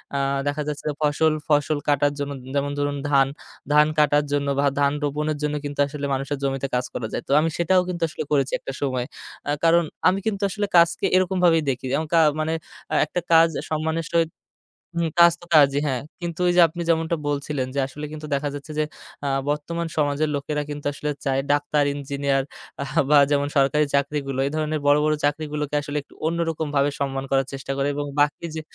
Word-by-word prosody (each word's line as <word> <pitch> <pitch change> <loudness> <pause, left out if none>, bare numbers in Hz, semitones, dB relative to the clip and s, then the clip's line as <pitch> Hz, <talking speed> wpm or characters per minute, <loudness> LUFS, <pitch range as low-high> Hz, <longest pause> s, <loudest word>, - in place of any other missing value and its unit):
আ - - +1 0.3
দেখা 145 +1 -1
যাচ্ছে 150 -1 -5 0.2
ফসল, 155 +1 +2 0.2
ফসল 150 0 +2
কাটার 145 0 +3
জন্য 145 0 -3 0.2
যেমন 140 0 0
ধরুন 145 0 -1
ধান, 135 -2 +4 0.5
ধান 150 0 +6
কাটার 150 0 +4
জন্য 145 0 0
বা 140 - +3
ধান 140 0 +3
রোপণের 150 +1 -1
জন্য 150 0 0
কিন্তু 145 0 -6
আসলে 145 0 -5
মানুষের 135 +2 -2
জমিতে 135 0 -1
কাজ 125 0 0
করা 115 - -3
যায়। - - -3
তো - - -4
আমি 160 +2 +1
সেটাও 180 +2 +3
কিন্তু 170 -2 -3
আসলে 155 - -5
করেছি 140 -2 +2
একটা - - -6
সময়। 130 -3 -1 0.4
আ - - +2
কারণ 170 +1 +5 0.2
আমি 185 +1 +3
কিন্তু 210 -2 -1
আসলে 205 +2 -2
কাজকে 170 0 +4
এরকমভাবেই 180 -3 +3
দেখি 130 0 -2
এবং 160 - -2
কা 165 - +6 0.2
মানে 155 +1 0 0.5
একটা - - -3
কাজ 165 0 +7 0.2
সম্মানের 160 +1 -1
সহিত, 165 -1 +2 0.7
হুম, 170 -1 +1
কাজ 170 0 +8
তো - - -12
কাজই, 140 -2 +6
হ্যাঁ। 130 -3 -1 0.2
কিন্তু 170 -1 -5
ওই - - +4
যে, 180 - +7
আপনি 170 +2 -7
যেমনটা 165 0 +1
বলছিলেন 140 -2 -2
যে, - - +1
আসলে 150 +2 -7
কিন্তু 155 0 -7
দেখা 145 +1 -1
যাচ্ছে 145 +2 -8
যে, - - +3 0.4
আ - - 0 0.2
বর্তমান 170 +3 -2
সমাজের 150 0 +1
লোকেরা 150 +1 -2
কিন্তু 145 0 -6
আসলে 150 +1 -4 0.2
চায় 135 -1 +1
ডাক্তার, 145 0 +2
ইঞ্জিনিয়ার 140 -1 -1 0.7
বা 150 - +7
যেমন 145 0 +2
সরকারি 145 +2 +3
চাকরিগুলো। 140 -1 -1
এই - - -3
ধরনের 155 0 -1
বড়, 145 0 +6
বড় 155 - +3
চাকরিগুলোকে 150 0 -2
আসলে 145 +1 -4
একটু - - -22
অন্যরকমভাবে 160 -4 0
সম্মান 135 -1 -2
করার 135 -1 +2
চেষ্টা 135 0 -5
করে 140 0 +1
এবং 145 - -2
বাকি 145 +3 +1
যে, 160 - -3
145 Hz, 190 wpm, -23 LUFS, 140-160 Hz, 0.7 s, কাজ